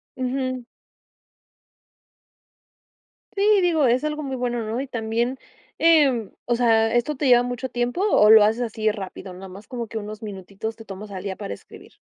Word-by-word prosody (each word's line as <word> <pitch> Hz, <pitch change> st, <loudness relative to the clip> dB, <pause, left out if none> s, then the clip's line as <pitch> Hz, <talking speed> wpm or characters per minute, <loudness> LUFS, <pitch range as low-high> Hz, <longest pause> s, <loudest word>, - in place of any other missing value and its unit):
Ujú. 255 Hz, -1 st, -3 dB, 2.7 s
Sí, 405 Hz, 0 st, +4 dB
digo, 320 Hz, -6 st, +3 dB
es 245 Hz, +3 st, +2 dB
algo 305 Hz, 0 st, -2 dB
muy 270 Hz, -2 st, -4 dB
bueno, 240 Hz, -1 st, -2 dB
¿no? 220 Hz, +3 st, -3 dB
Y 275 Hz, -, -2 dB
también, 235 Hz, +1 st, -2 dB, 0.4 s
em, 285 Hz, -10 st, +4 dB, 0.2 s
o 240 Hz, -, +1 dB
sea, 225 Hz, -2 st, +3 dB
¿esto 240 Hz, +5 st, +1 dB
te 285 Hz, -, -3 dB
lleva 245 Hz, -1 st, +6 dB
mucho 245 Hz, +1 st, -3 dB
tiempo, 245 Hz, +7 st, -2 dB
o 300 Hz, -, +5 dB
lo 220 Hz, -1 st, +9 dB
haces 220 Hz, +4 st, +2 dB
así 220 Hz, -2 st, 0 dB
rápido? 190 Hz, -2 st, -8 dB
Nada 190 Hz, +1 st, -10 dB
más, 195 Hz, +3 st, -12 dB
como 235 Hz, -3 st, -5 dB
que 225 Hz, -, -6 dB
unos 215 Hz, +1 st, -7 dB
minutitos 200 Hz, +2 st, -6 dB
te 225 Hz, 0 st, -13 dB
tomas 200 Hz, +2 st, -8 dB
al 190 Hz, -1 st, -7 dB
día 195 Hz, -2 st, -4 dB
para 100 Hz, -, -6 dB
escribir. -, -, -16 dB
235 Hz, 175 wpm, -23 LUFS, 215-255 Hz, 2.7 s, lo